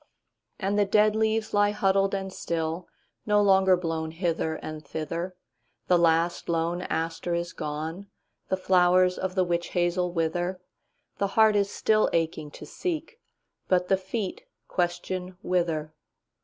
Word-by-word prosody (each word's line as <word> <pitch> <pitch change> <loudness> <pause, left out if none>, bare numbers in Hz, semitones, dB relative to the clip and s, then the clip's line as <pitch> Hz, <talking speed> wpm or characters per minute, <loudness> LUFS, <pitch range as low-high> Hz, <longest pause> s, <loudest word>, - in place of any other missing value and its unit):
And 200 +1 0
the 205 - +4
dead 210 +1 +3
leaves 220 0 0
lie 205 0 +4
huddled 195 -1 +2
and 190 -1 -4
still, 165 0 -3 0.4
No 210 0 +4
longer 190 -2 +5
blown 165 -2 -2
hither 165 -1 -1
and 155 -1 -7
thither; 165 +5 -4 0.5
The 180 - +4
last 170 +1 +2
lone 170 +1 0
aster 165 0 -2
is 170 0 -3
gone; 160 +4 -5 0.4
The 190 - +1
flowers 185 0 +4
of 190 0 -3
the 185 - +3
witch 175 -1 -1
hazel 175 0 +1
wither; 175 +2 -1 0.6
The 200 - +2
heart 220 -1 +6
is 200 -1 +2
still 215 +1 +2
aching 160 -2 -1
to - - -11
seek, 360 +6 -4 0.5
But 180 -1 +2
the 195 - +4
feet 200 - -4 0.2
question 180 +1 -2
'Whither? 165 -4 -1
180 Hz, 140 wpm, -27 LUFS, 165-195 Hz, 0.6 s, heart